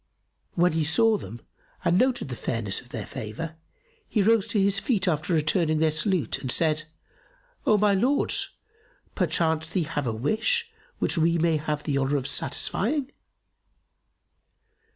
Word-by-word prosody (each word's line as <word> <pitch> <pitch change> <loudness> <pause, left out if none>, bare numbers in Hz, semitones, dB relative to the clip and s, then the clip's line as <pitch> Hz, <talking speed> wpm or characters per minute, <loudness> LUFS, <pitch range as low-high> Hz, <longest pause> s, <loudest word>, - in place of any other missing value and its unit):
When 175 +1 +3
he 160 0 0
saw 220 +9 +3
them 115 +4 -9 0.4
and 170 - +3
noted 255 - +1
the 125 - -4
fairness 105 -3 -3
of 125 - -20
their - - -5
favour, 140 +6 -6 0.5
he 210 - +2
rose 220 -1 +3
to 210 - 0
his 195 0 +2
feet 220 -8 0
after 155 0 0
returning 155 0 +2
their 160 0 +2
salute, 155 - -1
and 130 - -1
said, 155 +1 +2 0.8
"O 215 - +5
my 205 0 +3
lords, 255 +9 +1 0.6
perchance 160 0 0
ye 180 - +2
have 150 -4 -3
a - - 0
wish 220 - 0 0.3
which 170 - 0
we 165 +1 +3
may 165 -1 +2
have 150 -1 -3
the 140 -2 0
honour 140 +2 +1
of 130 - -4
satisfying?" 260 - 0
160 Hz, 150 wpm, -26 LUFS, 145-200 Hz, 0.8 s, O